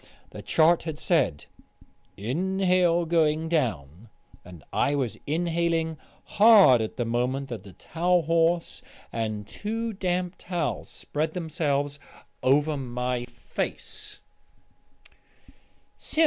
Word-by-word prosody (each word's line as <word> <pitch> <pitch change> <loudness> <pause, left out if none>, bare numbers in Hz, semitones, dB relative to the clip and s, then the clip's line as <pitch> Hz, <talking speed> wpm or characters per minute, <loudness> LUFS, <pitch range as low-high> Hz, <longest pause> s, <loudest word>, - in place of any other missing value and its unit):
The - - -8
chart 165 +1 +3
had 160 -3 -5
said, 140 - +1 0.7
"Inhale 180 - +1
going 160 -1 +2
down," 110 - -2 0.3
and 90 -3 -13
I 145 - +2
was 130 -5 -1
inhaling 165 0 0 0.3
hard 200 - +6
at 110 - -4
the 120 - -1
moment 125 +4 -1
that 115 -6 -6
the 95 -2 -13
towel 175 - 0
horse 165 +2 +1 0.3
and 110 -2 -3
two 225 - -4
damp 180 -2 -2
towels 175 -5 -3
spread 155 +3 -3
themselves 145 -4 -1 0.4
over 145 +3 +3
my 125 -1 -3
face. 120 0 -6
155 Hz, 105 wpm, -26 LUFS, 125-170 Hz, 0.7 s, hard